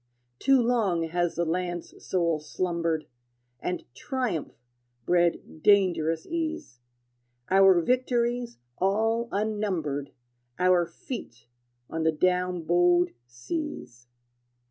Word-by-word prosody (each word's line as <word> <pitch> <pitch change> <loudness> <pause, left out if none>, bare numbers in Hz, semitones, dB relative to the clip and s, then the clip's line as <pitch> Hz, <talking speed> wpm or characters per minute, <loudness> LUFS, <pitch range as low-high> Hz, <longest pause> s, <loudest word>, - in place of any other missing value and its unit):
Too 270 0 +4
long 225 -8 +1
has 175 0 0
the 170 - 0
land's 175 +1 -3
soul 170 -4 +1
slumbered, 170 0 -2 0.5
And 180 +6 -3
triumph 250 - -3 0.5
bred 175 -2 +1
dangerous 170 -5 +3
ease, 325 - -4 0.7
Our 190 -1 +6
victories 245 0 0 0.2
all 225 +5 +1
unnumbered, 195 -10 -2 0.5
Our 180 -1 +3
feet 170 - -8 0.4
on 165 - -4
the 160 0 +3
down 180 +1 +1
bowed 175 +1 +3 0.2
seas. 120 - -6
180 Hz, 95 wpm, -27 LUFS, 165-225 Hz, 0.7 s, Our